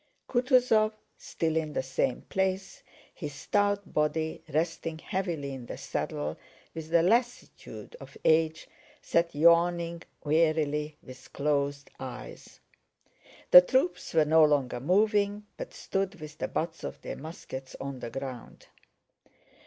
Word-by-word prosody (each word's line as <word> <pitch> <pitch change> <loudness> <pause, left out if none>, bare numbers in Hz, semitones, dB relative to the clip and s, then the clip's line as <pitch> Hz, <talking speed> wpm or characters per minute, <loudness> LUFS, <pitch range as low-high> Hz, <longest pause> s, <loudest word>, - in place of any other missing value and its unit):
Kutúzov 245 -4 +3 0.2
still 160 -1 -2
in 155 -2 -1
the - - -1
same 130 -1 -1
place, 190 0 -2 0.3
his 145 -4 -6
stout 205 +3 0
body 155 +1 0
resting 165 +1 -1
heavily 165 -6 -3
in 125 -3 -8
the - - -6
saddle 75 +1 -3 0.3
with 160 -1 -7
the 170 0 +4
lassitude 240 - -1
of - - -12
age, 160 0 +3 0.4
sat 170 -2 +1
yawning 170 +1 +3 0.2
wearily 155 -1 +1
with 130 0 -13
closed 140 -1 -1
eyes. 125 -2 -9 0.9
The 180 - +13
troops 260 - 0
were 155 -1 +5
no 160 +1 +6
longer 140 -5 +2
moving, 205 - +2
but - - -7
stood 195 -1 -3
with 155 0 -10
the - - -1
butts 160 0 -3
of - - -6
their - - -5
muskets 135 -4 -8
on 135 -1 -5
the 120 - -5
ground. 130 -1 -7
160 Hz, 130 wpm, -29 LUFS, 145-190 Hz, 0.9 s, The